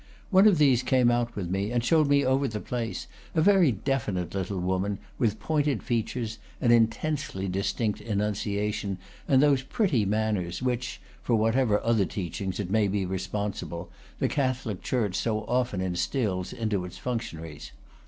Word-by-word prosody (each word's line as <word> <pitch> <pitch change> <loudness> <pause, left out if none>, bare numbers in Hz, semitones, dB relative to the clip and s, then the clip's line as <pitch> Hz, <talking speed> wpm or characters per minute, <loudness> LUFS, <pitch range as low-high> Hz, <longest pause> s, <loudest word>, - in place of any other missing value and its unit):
One 195 +2 +7
of 200 -5 +5
these 135 -5 +5
came 125 -1 +3
out 120 -1 0
with 90 -4 -3
me, 100 +3 -1
and 120 -1 +1
showed 155 -1 +4
me 140 0 +3
over 135 +2 +2
the 110 -3 -4
place, 115 -4 -4 0.3
a - - +3
very 190 -7 +5
definite 105 -6 -2
little 95 0 -2
woman, 95 +3 -1 0.2
with 110 -4 +1
pointed 145 -6 0
features, 115 -1 -2 0.2
an 120 - +3
intensely 115 -2 +1
distinct 100 +3 -1
enunciation, 105 -1 -1 0.3
and 135 0 +5
those 140 -3 +4
pretty 165 - +1
man 110 +1 +1
ners 85 -1 -4
which 125 0 -2 0.2
(for 120 - +1
whatever 115 0 +3
other 115 -4 +3
teachings 95 +1 -4
it 95 -3 -3
may 105 -1 +3
be 100 0 0
responsible) 95 -2 -4 0.3
the - - +1
Catholic 130 -8 -1
church 110 -7 0
so 110 0 0
often 120 -6 0
instils 95 +2 -1
into 105 -5 -1
its 90 - -8
functionaries. 80 - -5
110 Hz, 160 wpm, -27 LUFS, 100-130 Hz, 0.3 s, One